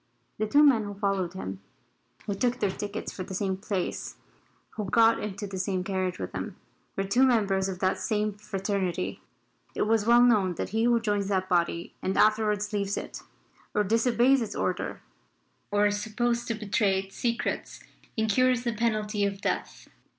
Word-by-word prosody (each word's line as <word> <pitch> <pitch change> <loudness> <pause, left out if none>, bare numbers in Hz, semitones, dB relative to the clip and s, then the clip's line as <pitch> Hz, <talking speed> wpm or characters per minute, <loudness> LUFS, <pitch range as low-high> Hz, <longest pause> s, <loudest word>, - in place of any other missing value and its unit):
The 215 - 0
two 290 +7 +5
men 260 -7 +5
who 205 0 -6
followed 195 -3 -1
him 95 - -6 0.6
who 205 - -1
took 245 +5 0
their 205 -4 +1
tickets 205 +2 -5
for - - -7
the 185 +1 -5
same 190 0 0
place 195 -1 -3 0.6
who 210 -3 -4
got 230 +1 +5
into 205 0 -4
the 195 -2 -5
same 185 -1 -1
carriage 185 -2 -2
with - - -5
him - - -5 0.4
were 195 - 0
two 200 +6 +1
members 200 -7 +3
of 185 - -4
that 185 0 +1
same 210 -1 0
fraternity. 195 -2 -3 0.5
It - - +1
is 220 0 +1
well 240 +1 +7
known 205 -7 +3
that - - -3
he 225 +3 +1
who 240 -1 +4
joins 205 -3 0
that 190 -2 0
body 170 -2 0
and 190 - -1
afterwards 210 -1 +2
leaves 200 -1 -1
it, - - -6 0.5
or 210 - +3
disobeys 240 +5 +3
its 225 - -4
order, - - -2 0.7
or 205 0 +3
is 205 0 +1
supposed 235 +2 -1
to 230 - -1
betray 205 -2 +1
its 195 0 -6
secrets, 235 -1 -2 0.4
incurs 245 +3 +2
the 235 -2 -1
penalty 215 -2 0
of 200 -1 -1
death. - - -3
205 Hz, 175 wpm, -28 LUFS, 195-225 Hz, 0.7 s, well